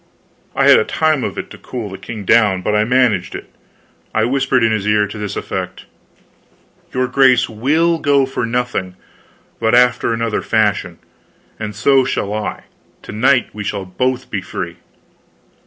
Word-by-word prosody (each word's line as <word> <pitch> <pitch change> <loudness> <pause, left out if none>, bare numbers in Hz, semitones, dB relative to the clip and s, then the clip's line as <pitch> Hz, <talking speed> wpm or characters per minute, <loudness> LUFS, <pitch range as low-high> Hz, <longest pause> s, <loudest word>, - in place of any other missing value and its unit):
I - - +3
had - - +8
a - - +2
time 155 - 0
of - - -4
it - - -6
to - - -11
cool 120 -4 -6
the 95 - -7
king 105 -1 -7
down, 100 -4 +3
but 105 - 0
I 105 0 +3
managed 120 -7 +1
it. - - -9 0.6
I 110 - +3
whispered 130 0 +1
in 115 - +3
his 105 -2 -1
ear, 105 -1 +3
to 105 +2 -8
this 105 -1 -4
effect: - - -5 1.1
"Your 130 0 0
grace 130 -2 +4
will 155 +9 +1
go 140 -2 +3
for 130 -1 -4
nothing, 120 -6 -2 0.6
but 115 +1 +2
after 125 -1 +3
another 115 -1 -1
fashion. - - 0 0.6
And 105 -2 -5
so 135 +5 +4
shall 105 -5 -2
I. 105 0 -4 0.4
To - - -9
night 125 +4 +2
we 105 - -6
shall 100 -1 -3
both 125 +7 -2
be 100 - -2
free." - - -6
115 Hz, 170 wpm, -17 LUFS, 105-130 Hz, 1.1 s, had